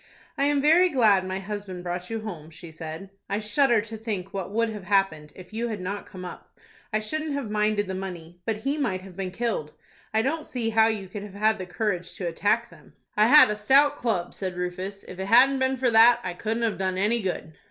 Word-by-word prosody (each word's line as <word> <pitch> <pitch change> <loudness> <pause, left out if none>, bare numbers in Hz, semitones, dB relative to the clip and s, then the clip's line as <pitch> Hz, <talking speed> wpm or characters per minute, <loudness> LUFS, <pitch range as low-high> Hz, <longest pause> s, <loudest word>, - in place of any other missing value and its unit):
"I 280 - +1
am 285 -1 +2
very 340 +5 +6
glad 210 - +3
my 185 0 -2
husband 195 -2 -6
brought 180 0 -4
you 225 -1 -3
home," 170 -8 -7
she 165 +1 -12
said. 160 +4 -8 0.2
"I 200 +1 0
shudder 230 +2 +3
to 220 +1 -7
think 205 -4 -5
what 195 -3 -4
would 230 +2 0
have 210 -4 -7
happened, 175 -7 +1
if 185 +2 -13
you 230 +2 -2
had 215 -3 -4
not 200 +3 -5
come 185 -1 -9
up. 180 - -11 0.3
I 215 - +1
shouldn't 310 +7 -2
have 275 -7 -3
minded 210 -1 +1
the 190 - -5
money; 175 -3 -7
but 220 +1 -1
he 285 +3 0
might 190 -10 -1
have 190 -2 -12
been 190 -1 -3
killed. 205 -7 -3 0.4
I 220 0 +2
don't 310 +4 -2
see 230 -3 -2
how 220 0 +5
you 210 -4 -2
could 200 +2 -7
have 200 -1 -10
had 215 +1 +2
the 185 - -5
courage 180 -2 -2
to 185 - -5
attack 175 +4 0
them." - - -18 0.2
"I 210 +1 +5
had 295 -4 +8
a - - -1
stout 275 +7 +4
club," 210 -10 -1
said 185 -2 -4
Rufus; 185 +3 -4
"if 185 - -9
it 190 - -3
hadn't 260 +5 +6
been 260 0 +1
for 250 -1 +1
that, 230 +2 +7
I 180 - -3
couldn't 225 +5 -2
have 225 -4 0
done 185 -1 -1
any 220 +5 +1
good." 175 -5 -4
210 Hz, 235 wpm, -26 LUFS, 185-230 Hz, 0.4 s, had